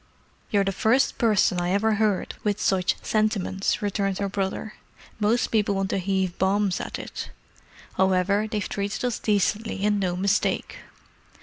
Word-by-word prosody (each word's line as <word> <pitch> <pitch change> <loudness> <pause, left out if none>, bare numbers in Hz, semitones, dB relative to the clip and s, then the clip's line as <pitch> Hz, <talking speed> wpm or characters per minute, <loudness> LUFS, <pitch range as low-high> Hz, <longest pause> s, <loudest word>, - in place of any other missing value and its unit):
"You're 200 -1 +3
the 195 - 0
first 225 +7 +2
person 205 -5 +3
I 175 - -1
ever 215 +2 +2
heard 210 -3 +1
with 210 -1 0
such 185 -2 +1
sentiments," 210 -2 0
returned 195 -1 -1
her 200 - -1
brother. 195 +2 -3 0.5
"Most 220 +3 +1
people 210 -2 +2
want 195 0 -1
to - - 0
heave 190 -1 -1
bombs 195 0 +1
at - - -5
it. - - -7 0.7
However, 190 +3 +2
they've 210 -2 -2
treated 200 +4 -3
us 245 -2 -1
decently, 210 0 0
and 210 -1 +2
no 180 -2 0
mistake. 195 +2 0
200 Hz, 150 wpm, -25 LUFS, 190-215 Hz, 0.7 s, You're